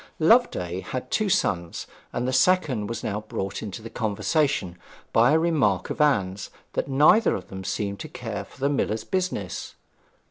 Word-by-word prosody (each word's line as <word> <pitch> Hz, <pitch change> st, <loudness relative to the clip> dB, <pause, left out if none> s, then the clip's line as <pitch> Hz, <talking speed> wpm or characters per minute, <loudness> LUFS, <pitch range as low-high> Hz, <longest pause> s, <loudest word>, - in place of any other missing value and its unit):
Loveday 155 Hz, -, +3 dB
had 130 Hz, +7 st, -6 dB
two 215 Hz, -2 st, +1 dB
sons, 85 Hz, -, 0 dB, 0.3 s
and 120 Hz, +1 st, -2 dB
the 130 Hz, -, -1 dB
second 130 Hz, -, +2 dB
was 115 Hz, -, -5 dB
now 105 Hz, 0 st, -2 dB
brought 100 Hz, -2 st, -4 dB
into 110 Hz, 0 st, -6 dB
the 115 Hz, -, -7 dB
conversation 110 Hz, -, 0 dB, 0.3 s
by 120 Hz, +4 st, +5 dB
a 155 Hz, -, +5 dB
remark 150 Hz, -, +1 dB
of -, -, -2 dB
Anne's 100 Hz, -10 st, +1 dB, 0.2 s
that -, -, -1 dB
neither 150 Hz, +11 st, +5 dB
of -, -, -7 dB
them 95 Hz, 0 st, -7 dB
seemed 100 Hz, 0 st, -3 dB
to -, -, -7 dB
care -, -, -5 dB
for -, -, -18 dB
the 140 Hz, +1 st, +1 dB
miller's 110 Hz, -6 st, 0 dB
business. 180 Hz, -, -3 dB
115 Hz, 170 wpm, -25 LUFS, 100-150 Hz, 0.3 s, by